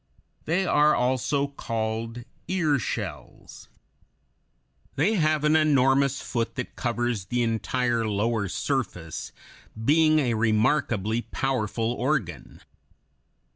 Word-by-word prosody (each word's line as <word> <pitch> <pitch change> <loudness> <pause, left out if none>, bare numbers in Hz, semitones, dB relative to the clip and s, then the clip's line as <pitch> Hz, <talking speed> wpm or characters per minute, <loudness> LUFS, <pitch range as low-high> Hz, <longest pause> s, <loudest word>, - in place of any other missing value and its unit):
They 175 +5 +1
are 150 -2 +4
also 130 +3 +1
called 115 -3 -4 0.2
ear 160 -7 +1
shells. - - -6 1.3
They 215 - +2
have 155 -6 +1
an 150 +1 +4
enormous 140 -2 +3
foot 115 -1 -3
that 125 - -5
covers 120 -4 -2
the 120 +2 0
entire 115 0 0
lower 105 0 0
surface, 90 - -3 0.5
being 155 +2 +4
a 130 -6 +1
remarkably 110 0 +1
powerful 120 -4 -2
organ. 120 - -3
125 Hz, 95 wpm, -26 LUFS, 115-145 Hz, 1.3 s, are